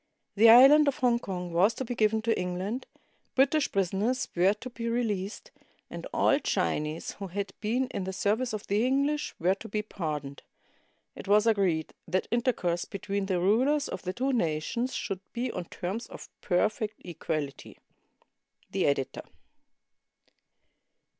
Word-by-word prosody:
The 225 Hz, +2 st, +7 dB
island 275 Hz, +6 st, +8 dB
of 280 Hz, -, +1 dB
Hong 245 Hz, -2 st, +2 dB
Kong 180 Hz, -5 st, -5 dB
was 195 Hz, +7 st, +3 dB
to 265 Hz, -, -4 dB
be 245 Hz, -, -3 dB
given 220 Hz, -1 st, +1 dB
to 225 Hz, 0 st, +2 dB
England; 185 Hz, +7 st, -3 dB, 0.5 s
British 280 Hz, +3 st, +3 dB
prisoners 195 Hz, +6 st, 0 dB
were 185 Hz, +4 st, +4 dB
to 255 Hz, -, -9 dB
be 235 Hz, -1 st, -4 dB
released, 215 Hz, -4 st, -2 dB, 0.4 s
and -, -, -6 dB
all -, -, +3 dB
Chinese 150 Hz, +2 st, -1 dB
who 195 Hz, -, -4 dB
had 195 Hz, +1 st, -4 dB
been 235 Hz, +5 st, 0 dB
in 190 Hz, -, -4 dB
the 190 Hz, -, -3 dB
serv 205 Hz, +4 st, 0 dB
ice 255 Hz, -, -2 dB
of 215 Hz, -2 st, -5 dB
the 205 Hz, +3 st, +1 dB
English 280 Hz, +4 st, 0 dB
were 180 Hz, +3 st, +3 dB
to 195 Hz, -, -10 dB
be 210 Hz, +1 st, -2 dB
pardoned. 150 Hz, -9 st, -5 dB, 0.7 s
It -, -, -9 dB
was 210 Hz, +2 st, +4 dB
agreed 190 Hz, -8 st, +1 dB
that 185 Hz, +2 st, 0 dB
intercourse 230 Hz, -8 st, 0 dB
between 200 Hz, 0 st, -3 dB
the 185 Hz, -2 st, 0 dB
rulers 255 Hz, +11 st, +2 dB
of 185 Hz, -, -5 dB
the 185 Hz, -, -3 dB
two 265 Hz, +7 st, -1 dB
nations 225 Hz, +6 st, -1 dB
should 195 Hz, -, -3 dB
be 245 Hz, +1 st, -2 dB
on 180 Hz, -, -5 dB
terms 190 Hz, +7 st, -5 dB
of -, -, -11 dB
perfect 215 Hz, +4 st, 0 dB
equality. 155 Hz, -5 st, -5 dB, 0.9 s
The -, -, +1 dB
Editor. 140 Hz, -2 st, -1 dB
205 Hz, 155 wpm, -28 LUFS, 180-240 Hz, 0.9 s, island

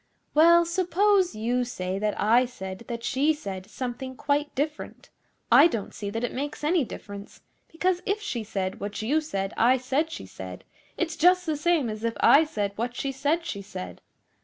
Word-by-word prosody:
'Well, 340 Hz, +3 st, +6 dB
suppose 370 Hz, -, +2 dB
you 240 Hz, +3 st, 0 dB
say 190 Hz, -5 st, -4 dB
that 210 Hz, 0 st, -1 dB
I 235 Hz, +4 st, +4 dB
said 190 Hz, -3 st, -8 dB
that 235 Hz, -1 st, -5 dB
she 285 Hz, +5 st, +2 dB
said 195 Hz, -9 st, -7 dB
something 260 Hz, +1 st, -5 dB
quite 290 Hz, +2 st, -1 dB
different, 300 Hz, +2 st, -4 dB, 0.4 s
I -, -, +8 dB
don't 225 Hz, -, -4 dB
see 205 Hz, -, -5 dB
that 225 Hz, +3 st, -4 dB
it 245 Hz, -, -2 dB
makes 285 Hz, +3 st, -4 dB
any 320 Hz, +1 st, +3 dB
difference; 200 Hz, -3 st, -9 dB, 0.3 s
because 360 Hz, +2 st, 0 dB
if 400 Hz, +2 st, +1 dB
she 265 Hz, -, -4 dB
said 195 Hz, -3 st, -3 dB
what 205 Hz, +2 st, -5 dB
you 295 Hz, +8 st, +2 dB
said 195 Hz, -8 st, -3 dB
I 250 Hz, +3 st, +5 dB
said 270 Hz, +5 st, 0 dB
she 325 Hz, -, -7 dB
said, -, -, -9 dB, 0.3 s
it's 335 Hz, -2 st, -1 dB
just 360 Hz, +2 st, +4 dB
the 315 Hz, -2 st, 0 dB
same 305 Hz, -3 st, +1 dB
as 215 Hz, 0 st, -5 dB
if 230 Hz, 0 st, -1 dB
I 310 Hz, +3 st, +6 dB
said 210 Hz, -10 st, -2 dB
what 240 Hz, +2 st, -3 dB
she 275 Hz, +2 st, -2 dB
said 290 Hz, +5 st, 0 dB
she 200 Hz, -, -4 dB
said. 185 Hz, -2 st, -8 dB
260 Hz, 185 wpm, -26 LUFS, 215-320 Hz, 0.4 s, I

